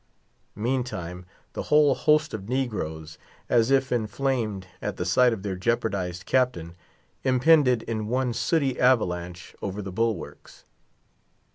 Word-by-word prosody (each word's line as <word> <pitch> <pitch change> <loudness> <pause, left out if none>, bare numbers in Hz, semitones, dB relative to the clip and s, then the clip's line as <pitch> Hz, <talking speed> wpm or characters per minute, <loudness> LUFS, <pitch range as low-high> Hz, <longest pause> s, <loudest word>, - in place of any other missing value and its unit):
Meantime, 105 -7 -3 0.3
the - - -3
whole 150 -2 +5
host 150 +3 +2
of 105 -1 -6
negroes, 80 - -3 0.3
as 115 0 +3
if 135 -1 +2
inflamed 115 -4 -1 0.2
at - - -4
the 90 - -2
sight 125 +7 +4
of 105 -4 -4
their 100 -2 -3
jeopardized 95 -4 -2
captain, 125 -11 0 0.5
impended 130 -2 +4
in 110 -2 -3
one 125 +1 0
sooty 135 +2 0
avalanche 90 -8 0
over 100 +1 -4
the 95 -2 -5
bulwarks. 110 -3 -4
115 Hz, 125 wpm, -25 LUFS, 95-130 Hz, 0.5 s, whole